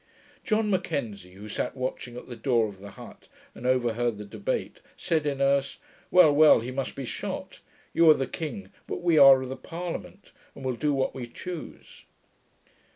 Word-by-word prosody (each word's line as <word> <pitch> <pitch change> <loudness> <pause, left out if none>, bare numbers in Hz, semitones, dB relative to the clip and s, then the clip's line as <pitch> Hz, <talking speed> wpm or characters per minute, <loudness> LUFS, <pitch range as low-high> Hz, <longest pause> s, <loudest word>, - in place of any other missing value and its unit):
John 215 -2 +1
M'Kenzie, 110 - -3
who 100 +3 -10
sat 105 - -3
watching 130 -1 -4
at - - -9
the 120 - -7
door 115 -1 +1
of 100 -2 -11
the 100 +1 -10
hut, - - -13 0.3
and 125 - -6
overheard 120 -3 +1
the 105 - -8
debate, - - -4 0.2
said 160 -4 0
in 140 -2 -2
Erse, 140 0 +1 0.3
'Well, 170 -5 +6
well; 155 -2 +7
he 120 +3 -5
must 135 0 -4
be 135 - -5
shot. - - -6 0.3
You 165 -1 +5
are 155 - +8
the 135 - -1
king, 165 +8 -6 0.2
but - - -5
we 170 -3 +4
are 135 -2 +8
the 130 +1 -5
parliament, 175 +3 -7 0.2
and 135 - -9
will 130 - 0
do 150 +4 0
what 135 -2 0
we 125 -2 -6
choose.' 175 +6 -9
135 Hz, 180 wpm, -27 LUFS, 120-155 Hz, 0.3 s, are